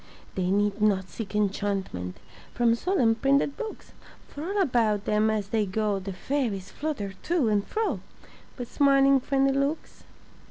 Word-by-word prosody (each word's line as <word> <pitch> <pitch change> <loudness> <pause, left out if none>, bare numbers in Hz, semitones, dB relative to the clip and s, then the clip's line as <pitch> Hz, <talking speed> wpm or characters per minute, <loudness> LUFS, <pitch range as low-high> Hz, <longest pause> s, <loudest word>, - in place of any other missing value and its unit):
They 185 -1 -1
need 205 +1 +1
not 190 -3 +2
seek 210 +1 -7
enchantment 195 - -1 0.4
From 240 -1 +3
solemn 240 -3 +2
printed 275 +4 +2
books, 445 -2 -7 0.3
For 290 - -8
all 395 +5 -1
about 230 - +2
them 215 +1 +2
as 210 -2 -1
they 215 -2 +1
go 205 +1 0
The 195 +1 -6
fairies 200 -1 -2
flutter 275 -11 -4
to 320 -9 +1
and 205 -1 +2
fro 440 0 -1 0.6
With 245 -2 -6
smiling 275 -1 +5
friendly 270 +1 +1
looks. 280 +3 -2
225 Hz, 150 wpm, -27 LUFS, 200-275 Hz, 0.6 s, smiling